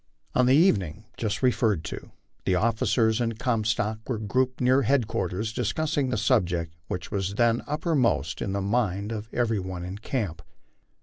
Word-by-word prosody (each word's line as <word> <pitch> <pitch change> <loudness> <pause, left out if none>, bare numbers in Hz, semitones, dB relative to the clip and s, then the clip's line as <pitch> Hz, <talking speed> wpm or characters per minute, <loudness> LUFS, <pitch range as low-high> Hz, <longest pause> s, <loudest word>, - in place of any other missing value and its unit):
On 125 -1 +3
the 130 - +6
evening 110 - +2
just 110 +2 -2
referred 115 -8 +2
to - - -7 0.4
the 95 - +2
officers 110 +2 +2
and 115 -2 -1
Comstock 110 -3 0
were 120 - 0
grouped 125 +5 0
near 130 +2 +4
headquarters 110 -5 0
discussing 135 +4 0
the 125 - 0
subject 90 -8 +1
which 90 - -5
was 100 0 -2
then 115 +1 +3
uppermost 140 - 0
in 95 - -2
the 100 - -1
mind 100 -1 0
of 110 0 -5
every 115 -4 +1
one 90 -1 -5
in 95 +3 -6
camp. 105 - -3
110 Hz, 160 wpm, -26 LUFS, 100-125 Hz, 0.4 s, the